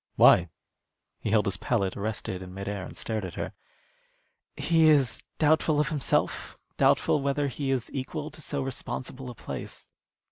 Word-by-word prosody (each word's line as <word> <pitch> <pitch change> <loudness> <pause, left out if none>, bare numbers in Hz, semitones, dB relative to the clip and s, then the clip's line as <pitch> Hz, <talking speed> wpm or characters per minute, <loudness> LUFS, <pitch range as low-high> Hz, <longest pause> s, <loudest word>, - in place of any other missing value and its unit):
"Why?" 85 -1 +7 0.7
He - - -3
held 105 0 +3
his 100 - 0
palette 100 -6 0
arrested 100 -3 -3
in 90 0 -9
mid 100 0 -5
air 100 -2 -3
and - - -9
stared 110 -2 -2
at 90 -3 -6
her. - - -4 1.0
"He 165 -2 +4
is 135 -6 +3 0.2
doubtful 155 0 +3
of 150 - +2
himself 150 -5 0 0.2
doubtful 150 - +3
whether 140 +1 +1
he 135 +1 -3
is 130 -3 -1
equal 150 +3 -4
to 155 - -12
so 145 -2 -2
responsible 130 0 -5
a 120 - -8
place." - - -7
130 Hz, 165 wpm, -28 LUFS, 105-145 Hz, 1.0 s, Why